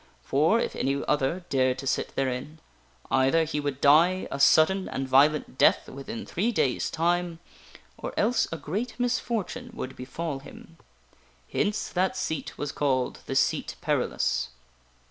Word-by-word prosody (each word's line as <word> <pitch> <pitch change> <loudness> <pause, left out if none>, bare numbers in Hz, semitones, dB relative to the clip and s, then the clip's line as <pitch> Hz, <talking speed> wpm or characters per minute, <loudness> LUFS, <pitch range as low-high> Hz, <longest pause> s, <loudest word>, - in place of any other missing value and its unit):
For, 155 +11 +3
if - - -2
any 135 +1 0
other 150 +5 0
dared 130 -2 +2
to 135 - -7
sit 130 - -1
therein, 135 +3 -2 0.5
either 135 +5 +3
he 150 -1 -2
would 145 -2 -3
die 170 +7 +4
a 140 - -4
sudden 185 +7 +4
and 135 0 -3
violent 140 +1 +3
death - - +4
within 220 - -7
three 215 +7 -1
days' 135 - 0
time, 175 +1 0 0.6
or - - -4
else 230 +2 +2
a 165 - -3
great 215 - -4
mis 245 0 +1
fortune 240 +2 -4
would 130 0 -6
befall 140 +3 -5
him. 165 +4 -14 0.8
Hence 205 +1 0
that 185 +1 0
seat 160 -5 -3
was 145 -1 -3
called 130 -4 0
the - - -3
SEAT - - +1
PERILOUS. 65 0 0
150 Hz, 150 wpm, -27 LUFS, 135-185 Hz, 0.8 s, die